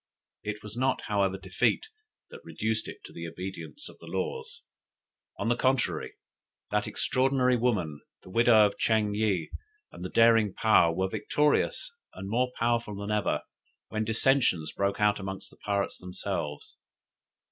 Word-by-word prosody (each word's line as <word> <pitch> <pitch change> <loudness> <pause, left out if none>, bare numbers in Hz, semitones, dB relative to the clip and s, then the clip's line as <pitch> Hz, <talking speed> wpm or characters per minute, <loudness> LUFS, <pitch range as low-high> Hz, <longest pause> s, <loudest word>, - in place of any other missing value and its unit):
It 105 0 -5
was 105 0 -8
not, 130 +2 +1
however, 100 -2 0
defeat 95 - 0 0.5
that 470 -1 -11
reduced 110 0 -2
it - - -9
to - - -11
the 85 0 -6
obedience 85 -3 -7
of - - -14
the 85 - -13
laws. 95 +2 -4 0.7
On - - -2
the 120 - +3
contrary, 130 +1 0 0.6
that 105 0 +1
extraordinary 130 -1 +2
woman, 105 -12 0 0.2
the 90 - -12
widow 115 0 +6
of 100 - -2
Ching 110 -2 +2
yih, 105 -6 0 0.4
and - - -10
the 90 - -4
daring 115 -3 +4
Paou, 105 -6 +5
were 95 +1 +1
victorious 150 - +1 0.2
and 95 - -6
more 125 +2 +1
powerful 115 -2 0
than 100 +1 -4
ever, 105 -1 0 0.5
when 110 0 -1
dissensions 110 - +2
broke 100 +1 0
out 105 0 +3
among 95 0 -5
the - - -19
pirates 100 -1 -2
themselves. 75 -5 -5
105 Hz, 150 wpm, -28 LUFS, 95-120 Hz, 0.7 s, widow